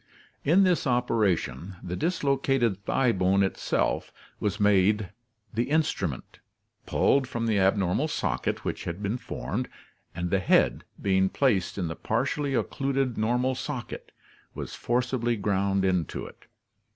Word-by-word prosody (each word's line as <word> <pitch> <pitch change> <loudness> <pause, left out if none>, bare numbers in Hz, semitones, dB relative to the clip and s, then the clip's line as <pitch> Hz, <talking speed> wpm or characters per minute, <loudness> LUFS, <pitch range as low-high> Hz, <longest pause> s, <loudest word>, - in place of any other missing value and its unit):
In 175 +7 +5
this 180 -6 +2
operation, 100 - 0
the 90 - -4
dislocated 135 - +1
thigh 130 -3 +2
bone 95 0 +2
itself 95 - -1 0.3
was 105 - -1
made 105 0 +3 0.4
the 115 +4 -1
instrument, 120 - -1 0.5
pulled 135 -2 +3
from 120 -2 -3
the 110 -3 +2
abnormal 95 - +2
socket - - -2
which - - -3
had 90 +4 -5
been 105 +5 -1
formed, - - -4 0.5
and 90 0 -3
the 95 - +3
head, - - +2
being 95 -1 +2
placed 105 -10 +1
in 90 -4 -1
the 80 - -4
partially 145 -2 -1
occluded 135 -1 0
normal 125 +4 +1
socket, 130 -1 -6 0.4
was - - -6
forcibly 120 -1 0
ground 100 -2 +1
into 90 -4 -1
it. - - -14
105 Hz, 130 wpm, -27 LUFS, 95-130 Hz, 0.5 s, In